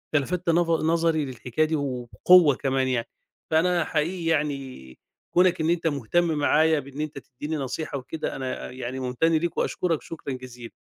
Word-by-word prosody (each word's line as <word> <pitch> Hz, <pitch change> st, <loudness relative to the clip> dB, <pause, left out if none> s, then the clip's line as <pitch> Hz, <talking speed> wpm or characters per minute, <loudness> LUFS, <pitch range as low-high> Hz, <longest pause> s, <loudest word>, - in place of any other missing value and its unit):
أنت 145 Hz, -, +4 dB
لفتّ 180 Hz, +2 st, -2 dB
نظ 170 Hz, 0 st, +3 dB
نظري 165 Hz, -2 st, +2 dB
للحكاية 130 Hz, +3 st, -1 dB
دي 160 Hz, +1 st, -1 dB
وبقوة 145 Hz, +4 st, +4 dB
كمان 135 Hz, -1 st, 0 dB
يعني، 125 Hz, -3 st, -1 dB, 0.4 s
فأنا 170 Hz, +2 st, +3 dB
حقيقي 165 Hz, +3 st, -1 dB
يعني 140 Hz, -, -2 dB, 0.4 s
كونك 180 Hz, -1 st, +4 dB
إن 155 Hz, -, +1 dB
أنت 170 Hz, -1 st, +1 dB
مهتم 145 Hz, +4 st, +1 dB
معايا 155 Hz, +2 st, +3 dB
بإن 140 Hz, +1 st, -7 dB
أنت 155 Hz, -1 st, -5 dB
تديني 145 Hz, +4 st, -6 dB
نصيحة 140 Hz, +2 st, -4 dB
وكده 130 Hz, +4 st, -5 dB
أنا 130 Hz, -2 st, -5 dB
يعني 130 Hz, +1 st, -5 dB
ممتن 125 Hz, +5 st, 0 dB
ليك 165 Hz, +1 st, 0 dB
وأشكرك 170 Hz, -4 st, 0 dB
شكرًا 160 Hz, -4 st, -6 dB
جزيلًا. 125 Hz, -2 st, -9 dB
150 Hz, 160 wpm, -25 LUFS, 130-165 Hz, 0.4 s, أنت